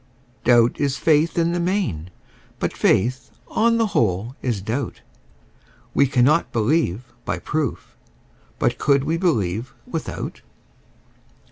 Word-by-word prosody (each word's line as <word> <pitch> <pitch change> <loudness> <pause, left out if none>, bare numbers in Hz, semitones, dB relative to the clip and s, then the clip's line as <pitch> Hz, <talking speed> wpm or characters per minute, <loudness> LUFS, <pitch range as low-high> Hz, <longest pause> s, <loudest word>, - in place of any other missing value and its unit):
Doubt 120 -1 +4
is 140 -2 0
faith 160 +1 +2
in 170 0 +2
the 175 - -1
main: 170 - -1 0.5
but - - -2
faith, 120 +7 +1 0.2
on 230 +1 +2
the 225 - +3
whole, 110 +3 0
is 120 -6 -1
doubt: 120 +7 -3 0.9
We 140 - +4
cannot 135 +5 +3
believe 120 - 0
by - - -2
proof: 150 -5 -3 0.6
but - - 0
could 140 -2 +3
we 165 +3 0
believe 120 - -1
without? 165 - -5
135 Hz, 120 wpm, -22 LUFS, 115-165 Hz, 0.9 s, Doubt